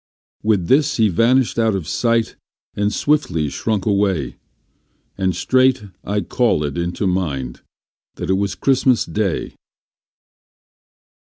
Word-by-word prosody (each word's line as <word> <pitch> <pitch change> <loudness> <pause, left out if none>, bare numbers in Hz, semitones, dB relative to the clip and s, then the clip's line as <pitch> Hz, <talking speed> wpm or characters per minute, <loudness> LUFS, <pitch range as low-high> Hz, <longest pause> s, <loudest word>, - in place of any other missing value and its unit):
With 105 -5 +1
this 145 +1 +3
he 110 -2 +3
vanished 120 +6 +2
out 110 -3 +2
of 90 -6 -4
sight 115 -2 0 0.4
and 105 0 0
swiftly 105 - 0
shrunk 105 +4 -2
away, 100 - 0 0.8
And 95 -2 -1
straight 130 +3 +2 0.2
I 105 0 -1
callëd 75 - 0
into 85 +3 -2
mind 75 -10 -2 0.5
that - - -3
it - - +4
was 95 0 -1
Christmas 130 -2 +2
day. 95 0 -2
105 Hz, 115 wpm, -19 LUFS, 90-115 Hz, 0.8 s, it